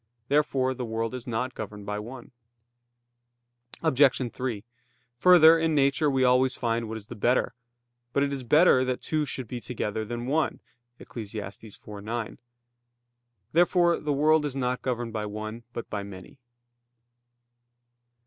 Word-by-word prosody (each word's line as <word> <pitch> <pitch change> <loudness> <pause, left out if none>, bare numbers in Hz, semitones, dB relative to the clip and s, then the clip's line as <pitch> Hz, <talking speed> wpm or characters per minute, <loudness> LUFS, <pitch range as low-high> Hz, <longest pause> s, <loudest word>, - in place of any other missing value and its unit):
Therefore 135 -3 +2
the 125 -1 -5
world 115 0 -3
is 125 -1 -7
not 125 +2 -2
governed 105 -1 -7
by 105 +1 -3
one. 120 +5 -9 1.5
Obj. 130 -5 +3
3: 120 -6 -4 0.5
Further, 165 0 +7
in 160 -1 +1
nature 140 +2 +3
we 135 -1 +1
always 125 +1 +3
find 115 -1 -1
what 110 - -4
is 105 - -10
the 115 - -9
better. 120 +4 +1 0.6
But 140 - +1
it 140 0 -1
"is 135 - -4
better 130 +1 +5
that 130 -1 -3
two 155 -1 0
should 130 -2 -5
be 120 +2 -6
together 110 -3 -3
than 120 +2 -5
one" 150 +4 0 0.4
(Eccles. 110 -3 -8
4:9). 105 +2 -7 1.1
Therefore 175 0 +3
the 150 - -2
world 150 +2 +3
is 145 -3 -3
not 125 -1 -1
governed 120 -3 -3
by 105 -1 -3
one, 110 +2 -6
but 120 - -6
by 105 - -4
many. 100 +5 -11
125 Hz, 145 wpm, -27 LUFS, 110-140 Hz, 1.5 s, Further